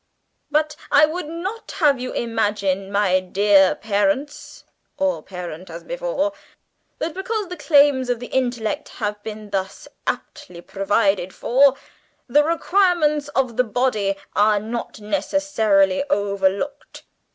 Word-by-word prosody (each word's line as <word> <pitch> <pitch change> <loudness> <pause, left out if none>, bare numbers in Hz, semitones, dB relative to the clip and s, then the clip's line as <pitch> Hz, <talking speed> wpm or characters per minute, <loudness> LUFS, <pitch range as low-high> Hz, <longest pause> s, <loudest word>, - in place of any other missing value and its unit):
"But 305 +1 +1 0.2
I 295 +2 +7
would 315 +1 -4
not 370 +8 -6
have 295 -8 +3
you 255 0 -4
imagine, 205 -4 -1
my 200 -2 +3
dear 195 +1 +4
parents 215 +7 -2 0.3
(or 285 -1 0
parent, 180 -1 -8
as 170 +1 -8
before), - - -2 0.6
that, 325 - -3
because 405 +1 -3
the 360 - -5
claims 285 -5 +4
of 245 -2 0
the 245 - -6
intellect 250 +2 -1
have 210 -2 -3
been 215 -1 -8
thus 190 -1 -3 0.2
amply 290 - -5
provided 195 -1 0
for, 275 +2 +4 0.5
the 290 +4 +4
requirements 335 -3 +2
of 255 -4 0
the 250 - +4
body 215 -4 0 0.2
are 210 0 +4
necessarily 215 -1 0
overlooked! 200 +7 -1
235 Hz, 120 wpm, -21 LUFS, 200-295 Hz, 0.6 s, I